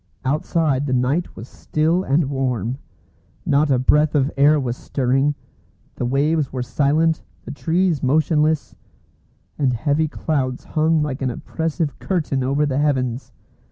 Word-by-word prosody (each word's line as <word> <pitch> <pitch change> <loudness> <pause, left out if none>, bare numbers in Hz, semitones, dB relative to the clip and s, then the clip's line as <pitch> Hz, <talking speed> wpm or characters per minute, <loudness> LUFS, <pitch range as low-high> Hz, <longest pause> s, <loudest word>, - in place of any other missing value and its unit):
Outside 145 0 0
the 130 - 0
night 130 +8 0
was 115 - -9
still 160 +7 0
and 145 +2 +2
warm. 130 -3 -2 0.7
Not 145 +1 +2
a 135 - +3
breath 150 +4 +3
of 140 0 +2
air 145 +2 +4
was 125 -3 -2
stirring; 135 +3 0 0.6
the 120 - -3
waves 145 +2 +1
were 125 -2 -3
silent, 155 +5 +1 0.2
the - - -6
trees 165 +1 0
motionless, 155 +2 +1 0.9
and 135 -4 +2
heavy 145 +6 +1
clouds 135 -5 -2
hung 155 0 +1
like 140 -3 -4
an 130 - 0
oppressive 160 +4 -3
curtain 150 -8 -1
over 140 +3 +1
the 140 -1 -1
heavens. 130 -4 -1
145 Hz, 140 wpm, -21 LUFS, 130-155 Hz, 0.9 s, air